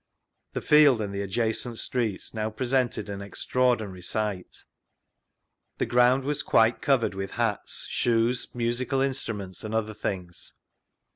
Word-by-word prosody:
The - - -2
field 150 -5 +6
and 100 -2 -3
the 100 - -2
adjacent 110 +3 -1
streets 115 -6 -2
now 110 -1 -1
presjented 125 +2 0
an 100 -1 -5
extraordinary 110 -2 0
sight: 100 0 -3 1.1
the - - 0
ground 125 +2 +4
was 145 +1 -1
quite 115 0 +3
covered 130 -7 +2
with 95 0 -4
hats, 115 -4 -1
shoes, 120 +1 +1
musical 120 +3 0
instruments, 115 -9 -3
and 110 0 -4
other 110 -1 -1
things. 90 -4 -5
115 Hz, 130 wpm, -27 LUFS, 100-125 Hz, 1.1 s, field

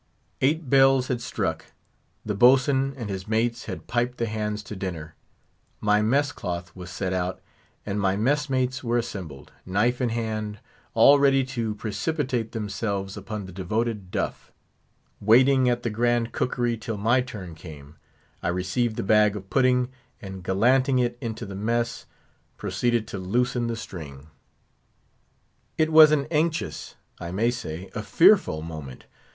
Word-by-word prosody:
Eight 150 +3 +1
bells 135 -1 +4
had 120 -2 -1
struck. - - -3 0.6
The 105 - -1
boatswain 135 +4 +4
and 115 -4 -5
his 95 -1 -5
mates 115 +2 0
had - - -7
piped 120 +1 -1
the 115 - 0
hands 105 -1 -3
to 105 - -8
dinner; 85 -5 -5 0.7
my 105 0 +3
mess 140 +7 +2
cloth 85 -5 -5
was 90 -1 -9
set 95 +1 -3
out, 90 0 -2 0.5
and 105 0 -2
my 95 -1 +2
messmates 130 +1 0
were 120 0 +1
assembled, 90 - -6
knife 115 +7 0
in 125 - +1
hand, 110 -2 -3 0.4
all 145 +1 +7
ready 135 -1 +4
to 120 -5 -3
precipitate 120 +2 -2
themselves 100 -2 -3
upon 100 0 -6
the 95 - -10
devoted 105 +2 -2
duff: - - -4 0.7
Waiting 130 +4 +5
at 120 0 -1
the 115 - -1
grand 120 +1 +1
cookery 120 -2 -1
till 110 -1 -5
my 115 +5 +3
turn 105 -9 -8
came, 75 -3 -12 0.5
I - - -2
received 95 +6 -1
the - - -3
bag 105 +1 +4
of 95 -1 -9
pudding, 125 -1 +3 0.3
and 95 -4 -8
gallanting 130 +8 +3
it 120 -1 +1
into 115 -1 -4
the 100 - -8
mess, 115 +4 -2 0.5
proceeded 110 +3 0
to 95 - -5
loosen 120 +5 0
the 115 - -2
string. 75 -8 -9 1.5
It 155 0 +2
was 155 -1 +9
an 145 -2 +2
anxious, 155 0 -1 0.2
I 85 - -6
may 115 +6 +1
say, 95 -7 -6
a - - -3
fearful 80 0 +4
moment. 75 -6 -8
110 Hz, 150 wpm, -25 LUFS, 95-125 Hz, 1.5 s, was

